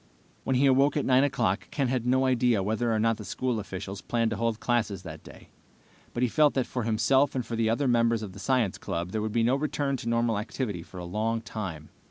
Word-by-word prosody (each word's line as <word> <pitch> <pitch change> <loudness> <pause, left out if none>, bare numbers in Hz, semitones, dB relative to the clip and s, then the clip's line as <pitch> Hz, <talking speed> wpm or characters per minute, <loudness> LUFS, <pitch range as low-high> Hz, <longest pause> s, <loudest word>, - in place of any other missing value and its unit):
When 130 - +1
he 135 +3 +3
awoke 135 +2 +4
at 145 - 0
9 130 +1 +4
o'clock 100 -9 0
Ken 140 -3 -1
had 125 -1 -1
no 130 +1 +3
idea 125 -5 +2
whether 110 +4 0
or 110 - +1
not 115 0 +2
the 105 - -8
school 125 +2 -2
officials 95 0 -6
planned 115 -2 0
to 110 - -2
hold 115 0 -1
classes 110 -6 -1
that 80 -3 -9
day, - - -14 0.6
but 120 - -2
he - - +4
felt 150 +4 +3
that 130 -2 +1
for 125 - -3
himself 120 +6 +2
and 130 - 0
the 115 -1 -1
other 130 +5 +1
members 115 -2 +2
of 100 -3 -7
the 100 - -11
science 115 -1 0
club 85 +2 -4
there 110 - -2
would 110 0 -2
be 115 +1 +1
no 125 +3 +3
return 140 -1 -1
to 115 - -4
normal 115 -2 +1
activity 105 -4 -4
for 90 - -12
a 90 - -6
long 110 +5 -1
time. 95 -8 -6
115 Hz, 240 wpm, -27 LUFS, 105-130 Hz, 0.6 s, awoke